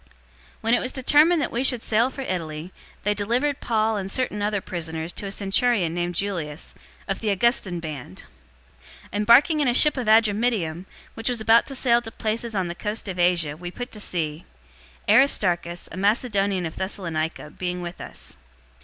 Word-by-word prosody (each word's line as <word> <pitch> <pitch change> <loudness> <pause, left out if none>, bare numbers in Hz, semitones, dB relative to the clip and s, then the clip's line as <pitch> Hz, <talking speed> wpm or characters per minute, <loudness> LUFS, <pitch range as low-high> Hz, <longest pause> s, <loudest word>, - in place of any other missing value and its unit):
027:001 - - -30 0.5
When 225 +1 +1
it - - +4
was 255 - -3
determined 300 +5 +4
that - - -3
we 240 +3 -1
should 250 -3 +4
sail 230 +3 +2
for 270 - -8
Italy, 170 -6 -5 0.3
they 210 - +1
delivered 240 +8 -1
Paul 220 -1 +1
and 195 -1 -4
certain 210 -2 -1
other 205 0 0
prisoners 165 -2 -4
to 205 - -4
a - - -5
centurion 200 -2 +1
named 175 0 -2
Julius, 170 -6 -4 0.3
of 195 - -2
the 220 - -2
Augustan 200 -3 +1
band. 145 - -8 0.8
027:002 - - -19
Embarking 245 +9 +5
in 290 - +2
a 245 - +2
ship 300 +1 +7
of 250 -4 -3
Adramyttium, 215 -6 +2 0.3
which 225 +1 -3
was 245 -2 0
about 225 +2 +4
to 275 - -5
sail 240 -2 +3
to 225 - -8
places 225 +1 -3
on 190 -2 0
the 170 - -4
coast 210 +4 -4
of 185 -2 -5
Asia, 175 -4 +2
we 175 +2 -7
put 245 +7 -7
to 215 - -9
sea; 160 -5 -3 0.6
Aristarchus, 175 -10 +3
a 165 - -8
Macedonian 200 -2 +1
of 160 - -6
Thessalonica, 165 -5 -3
being 180 0 -4
with 175 0 -7
us. - - -9
205 Hz, 185 wpm, -24 LUFS, 175-235 Hz, 0.8 s, ship